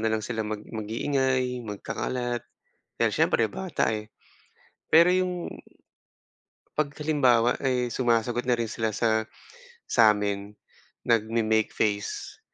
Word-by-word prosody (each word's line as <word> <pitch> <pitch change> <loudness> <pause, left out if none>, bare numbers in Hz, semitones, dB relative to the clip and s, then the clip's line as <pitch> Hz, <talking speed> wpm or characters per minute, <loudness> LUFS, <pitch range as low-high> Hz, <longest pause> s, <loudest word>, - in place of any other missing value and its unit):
na 110 - +2
lang 110 - -2
sila 115 0 -3
mag 105 -1 -4
mag-iingay, 125 +4 -1
magkakalat. 120 +3 -3 0.5
Dahil - - +3
siyempre - - +2
bata, 65 - -1
eh. 110 0 -6 0.8
Pero 170 +2 +7
yung 180 -1 -1 1.3
'pag 150 -2 +1
halimbawa 130 -6 +3
ay 125 -2 0
sumasagot 120 0 0
na 125 - +3
rin 115 -2 -2
sila 110 -2 -2
sa 110 -1 +1 0.6
sa'min, 105 -3 +2 0.6
nagme-make 110 -1 +2
face. 105 -1 -2
115 Hz, 110 wpm, -26 LUFS, 110-130 Hz, 1.3 s, Pero